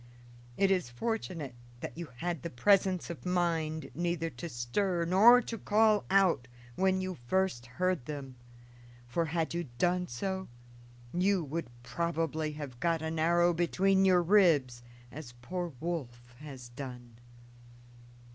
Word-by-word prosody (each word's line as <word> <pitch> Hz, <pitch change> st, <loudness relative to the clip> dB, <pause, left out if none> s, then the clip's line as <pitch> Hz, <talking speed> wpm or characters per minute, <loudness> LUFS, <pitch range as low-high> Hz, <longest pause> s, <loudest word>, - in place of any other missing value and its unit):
It 195 Hz, -1 st, +3 dB
is 180 Hz, -10 st, +1 dB
fortunate 165 Hz, -, -3 dB, 0.3 s
that -, -, -6 dB
you 170 Hz, 0 st, -6 dB
had 170 Hz, 0 st, -3 dB
the 170 Hz, -, -4 dB
presence 185 Hz, +6 st, +2 dB
of 170 Hz, -, -9 dB
mind 165 Hz, -3 st, -1 dB
neither 170 Hz, +1 st, -1 dB
to 170 Hz, -, -7 dB
stir 170 Hz, +8 st, -1 dB
nor 225 Hz, +8 st, +7 dB
to 230 Hz, -, -5 dB
call 215 Hz, 0 st, +3 dB
out 185 Hz, -10 st, +3 dB, 0.3 s
when 190 Hz, 0 st, +2 dB
you 185 Hz, -4 st, -4 dB
first 185 Hz, -9 st, 0 dB
heard 180 Hz, +2 st, -1 dB
them; 140 Hz, -4 st, -6 dB, 0.7 s
for, 165 Hz, +8 st, 0 dB
had 165 Hz, 0 st, -1 dB
you 170 Hz, 0 st, -2 dB
done 180 Hz, +4 st, +1 dB
so, 190 Hz, +10 st, -3 dB, 0.7 s
you 185 Hz, 0 st, +2 dB
would 160 Hz, +3 st, -4 dB, 0.2 s
probably 160 Hz, +3 st, -2 dB
have 145 Hz, -5 st, -8 dB
got 165 Hz, 0 st, 0 dB
an 160 Hz, 0 st, -3 dB
arrow 175 Hz, +2 st, +4 dB
between 190 Hz, +3 st, +2 dB
your 180 Hz, -2 st, +5 dB
ribs, 160 Hz, -11 st, +4 dB, 0.3 s
as 130 Hz, -4 st, -9 dB
poor 175 Hz, +4 st, -3 dB
Wolf 120 Hz, -8 st, -5 dB
has 135 Hz, -5 st, -9 dB
done." 125 Hz, -2 st, -9 dB
170 Hz, 135 wpm, -31 LUFS, 140-185 Hz, 0.7 s, nor